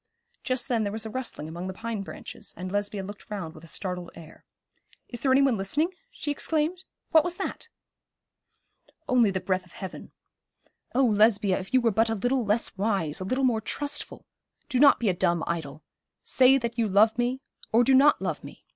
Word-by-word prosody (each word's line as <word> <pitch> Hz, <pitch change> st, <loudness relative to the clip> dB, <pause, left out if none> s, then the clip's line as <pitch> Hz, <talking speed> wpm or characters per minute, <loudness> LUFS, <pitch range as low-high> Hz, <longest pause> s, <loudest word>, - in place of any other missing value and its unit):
Just 255 Hz, -2 st, -1 dB
then 240 Hz, -4 st, +1 dB
there 205 Hz, -2 st, -1 dB
was 220 Hz, +1 st, -3 dB
a 220 Hz, -, -5 dB
rustling 240 Hz, -, -5 dB
among 170 Hz, +3 st, -6 dB
the 190 Hz, -, -6 dB
pine 225 Hz, 0 st, -4 dB
branches, 195 Hz, -, -9 dB
and 185 Hz, 0 st, -5 dB
Lesbia 205 Hz, 0 st, -2 dB
looked 205 Hz, +2 st, -10 dB
round 190 Hz, -7 st, -5 dB
with 155 Hz, -, -14 dB
a -, -, -12 dB
startled 180 Hz, 0 st, -4 dB
air. 160 Hz, -2 st, -14 dB, 0.6 s
'Is 240 Hz, -, -6 dB
there 265 Hz, +2 st, +1 dB
any 270 Hz, +1 st, +5 dB
one 265 Hz, -5 st, +3 dB
listening?' 300 Hz, -, 0 dB, 0.2 s
she 305 Hz, -11 st, -4 dB
exclaimed. 320 Hz, +5 st, -1 dB, 0.3 s
'What 320 Hz, -2 st, +6 dB
was 355 Hz, +1 st, -3 dB
that?' 385 Hz, -, -4 dB, 1.4 s
'Only 245 Hz, -5 st, +4 dB
the 190 Hz, -1 st, -1 dB
breath 185 Hz, 0 st, -1 dB
of 175 Hz, -, -20 dB
heaven. 190 Hz, -2 st, -8 dB, 0.8 s
Oh, 265 Hz, +1 st, +4 dB
Lesbia, 210 Hz, -3 st, +3 dB
if 190 Hz, 0 st, -9 dB
you 260 Hz, -, +4 dB
were 230 Hz, -1 st, +2 dB
but 225 Hz, +3 st, +2 dB
a 225 Hz, -, 0 dB
little 245 Hz, +5 st, 0 dB
less 210 Hz, +2 st, 0 dB
wise, 195 Hz, -7 st, -1 dB
a 185 Hz, -, -4 dB
little 255 Hz, +7 st, -1 dB
more 235 Hz, -4 st, +2 dB
trustful. 290 Hz, +6 st, -4 dB, 0.4 s
Do 255 Hz, -, 0 dB
not 280 Hz, +1 st, +7 dB
be 235 Hz, -, 0 dB
a 190 Hz, -, +3 dB
dumb 175 Hz, -2 st, +1 dB
idol. 155 Hz, -3 st, -4 dB, 0.4 s
Say 260 Hz, +1 st, +5 dB
that 235 Hz, -2 st, -4 dB
you 225 Hz, -, +2 dB
love 210 Hz, +3 st, +4 dB
me, 245 Hz, +2 st, 0 dB, 0.3 s
or 230 Hz, +2 st, +5 dB
do 265 Hz, -, +4 dB
not 280 Hz, +3 st, +6 dB
love -, -, -3 dB
me. -, -, -12 dB
220 Hz, 200 wpm, -27 LUFS, 190-260 Hz, 1.4 s, not